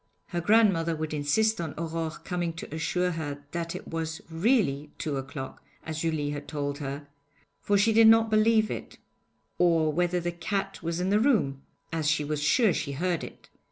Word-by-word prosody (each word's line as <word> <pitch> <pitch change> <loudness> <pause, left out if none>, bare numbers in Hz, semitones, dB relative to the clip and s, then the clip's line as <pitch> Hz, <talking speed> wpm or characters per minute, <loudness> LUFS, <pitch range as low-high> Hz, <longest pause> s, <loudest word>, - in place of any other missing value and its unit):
Her 175 -2 -2
grandmother 185 -5 +3
would 155 0 -4
insist 175 +9 +1
on 160 -4 -5
Aurore 165 -1 -4
coming 175 -2 -2
to 165 -2 -8
assure 180 +3 0
her 145 -3 -5
that 170 0 -3
it - - -8
was 160 -1 -3
really 165 - +1
two 145 -3 -2
o'clock, 135 0 -7 0.2
as 155 0 -4
Julie 155 -3 -1
had 145 0 -6
told 145 -2 -3
her, 140 0 -5 0.5
for 205 - +2
she 220 +3 +3
did 225 0 +7
not 225 0 +6
believe 220 0 +4
it; - - -6 0.6
or 165 -3 +3
whether 175 +2 +1
the 175 0 -2
cat 195 +3 -3
was 170 +1 -2
in 185 +2 0
the 205 - +4
room, 205 - +2 0.3
as 160 -2 +1
she 155 -1 +2
was 150 0 -2
sure 210 - +4
she 140 -3 -3
heard 175 +4 -1
it. - - -10
165 Hz, 185 wpm, -28 LUFS, 150-195 Hz, 0.6 s, did